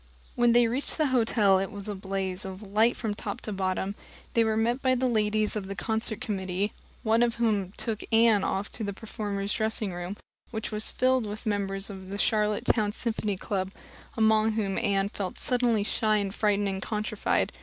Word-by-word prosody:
When 240 Hz, -1 st, +4 dB
they 240 Hz, 0 st, +6 dB
reached 250 Hz, +5 st, -2 dB
the 310 Hz, -, +3 dB
hotel 215 Hz, -5 st, +4 dB
it 195 Hz, -, -2 dB
was 200 Hz, 0 st, -8 dB
a 210 Hz, -, -2 dB
blaze 190 Hz, -1 st, -3 dB
of 190 Hz, +2 st, -7 dB
light 215 Hz, +4 st, +2 dB
from 220 Hz, -3 st, -2 dB
top 205 Hz, -1 st, -5 dB
to 215 Hz, -, -5 dB
bottom. 190 Hz, 0 st, -1 dB, 0.4 s
They 230 Hz, -, +4 dB
were 220 Hz, -1 st, +1 dB
met 235 Hz, +4 st, +1 dB
by 260 Hz, -1 st, +3 dB
the 255 Hz, +1 st, 0 dB
ladies 215 Hz, -3 st, +2 dB
of 200 Hz, -3 st, -3 dB
the 195 Hz, -, -5 dB
concert 220 Hz, +1 st, -1 dB
committee, 195 Hz, 0 st, -2 dB, 0.3 s
one 225 Hz, +1 st, +3 dB
of 240 Hz, -1 st, +2 dB
whom 210 Hz, -5 st, +1 dB
took 220 Hz, -2 st, -2 dB
Anne 225 Hz, -3 st, +5 dB
off 195 Hz, +2 st, -1 dB
to 220 Hz, -, -5 dB
the 200 Hz, -1 st, -2 dB
performers' 205 Hz, -1 st, -3 dB
dressing 220 Hz, -3 st, 0 dB
room 175 Hz, +3 st, -5 dB, 0.3 s
which 220 Hz, 0 st, -4 dB
was 215 Hz, 0 st, +1 dB
filled 255 Hz, -3 st, +2 dB
with 210 Hz, +1 st, -6 dB
the 220 Hz, -, +1 dB
members 195 Hz, 0 st, -1 dB
of 190 Hz, -1 st, -9 dB
a 200 Hz, -, -3 dB
Charlottetown 210 Hz, 0 st, +2 dB
Symphony 215 Hz, -4 st, -2 dB
Club, 190 Hz, 0 st, -2 dB, 0.5 s
among 220 Hz, 0 st, +4 dB
whom 200 Hz, -3 st, 0 dB
Anne 200 Hz, -3 st, +1 dB
felt 195 Hz, -3 st, -5 dB
suddenly 245 Hz, -5 st, +2 dB
shy 215 Hz, 0 st, +1 dB
and 200 Hz, -2 st, -1 dB
frightened 205 Hz, -1 st, +1 dB
and 190 Hz, -1 st, -2 dB
countrified. 215 Hz, 0 st, 0 dB
210 Hz, 195 wpm, -28 LUFS, 195-225 Hz, 0.5 s, they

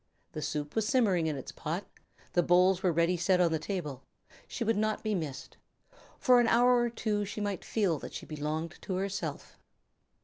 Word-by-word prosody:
The 155 Hz, -, -5 dB
soup 145 Hz, 0 st, -3 dB
was 220 Hz, -1 st, +1 dB
simmering 200 Hz, -10 st, +2 dB
in 155 Hz, -, -1 dB
its 135 Hz, -, -7 dB
pot, 165 Hz, +5 st, -4 dB, 0.5 s
the 175 Hz, -, +4 dB
bowls 180 Hz, +1 st, +4 dB
were 185 Hz, -, +2 dB
ready 170 Hz, +2 st, +2 dB
set 180 Hz, +2 st, +2 dB
on 175 Hz, -2 st, +3 dB
the 160 Hz, -, 0 dB
table. 155 Hz, -7 st, -4 dB, 0.5 s
She 235 Hz, -, -3 dB
would 225 Hz, 0 st, +1 dB
not 215 Hz, +1 st, 0 dB
be 215 Hz, -1 st, 0 dB
missed. 155 Hz, -8 st, -5 dB, 0.6 s
For 250 Hz, -4 st, +5 dB
an 240 Hz, -, +3 dB
hour 245 Hz, +2 st, +5 dB
or 240 Hz, 0 st, +1 dB
two 215 Hz, -3 st, -1 dB
she 205 Hz, +1 st, -5 dB
might 205 Hz, -3 st, -2 dB
feel 190 Hz, -9 st, 0 dB
that -, -, -8 dB
she -, -, -6 dB
belonged 155 Hz, +2 st, -4 dB
to 190 Hz, -, -3 dB
herself. 195 Hz, +1 st, -4 dB
185 Hz, 195 wpm, -30 LUFS, 160-215 Hz, 0.6 s, For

